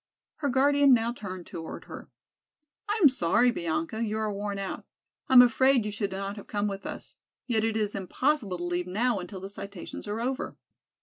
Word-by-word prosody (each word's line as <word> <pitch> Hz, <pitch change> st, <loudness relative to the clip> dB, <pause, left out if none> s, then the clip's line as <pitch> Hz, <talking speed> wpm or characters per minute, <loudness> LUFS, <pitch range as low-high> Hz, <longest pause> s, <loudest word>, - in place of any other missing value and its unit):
Her 290 Hz, -2 st, -1 dB
guardian 280 Hz, +1 st, +5 dB
now 230 Hz, 0 st, 0 dB
turned 185 Hz, -6 st, -7 dB
toward 165 Hz, -1 st, -7 dB
her. -, -, -10 dB, 0.8 s
"I 425 Hz, +2 st, +1 dB
am -, -, +11 dB
sorry, 245 Hz, 0 st, +3 dB
Bianca, 225 Hz, -, -2 dB
you 215 Hz, -1 st, -2 dB
are 215 Hz, -1 st, -1 dB
worn 200 Hz, 0 st, -3 dB
out. 195 Hz, -1 st, -4 dB, 0.5 s
I -, -, +2 dB
am 250 Hz, -1 st, +11 dB
afraid 255 Hz, 0 st, +4 dB
you 210 Hz, -, -2 dB
should 205 Hz, -1 st, -2 dB
not 195 Hz, +2 st, -4 dB
have 205 Hz, -, -10 dB
come 205 Hz, -1 st, -1 dB
with 200 Hz, -1 st, -5 dB
us. -, -, -8 dB, 0.3 s
Yet 225 Hz, -3 st, +1 dB
it 225 Hz, 0 st, 0 dB
is 210 Hz, -1 st, 0 dB
impossible 200 Hz, -, -1 dB
to 175 Hz, -, -5 dB
leave 175 Hz, 0 st, -2 dB
now 220 Hz, +4 st, +1 dB
until 185 Hz, +2 st, -7 dB
the 195 Hz, -, -5 dB
citations 200 Hz, 0 st, -7 dB
are 210 Hz, +2 st, -3 dB
over." 260 Hz, +3 st, -3 dB
210 Hz, 195 wpm, -28 LUFS, 195-250 Hz, 0.8 s, am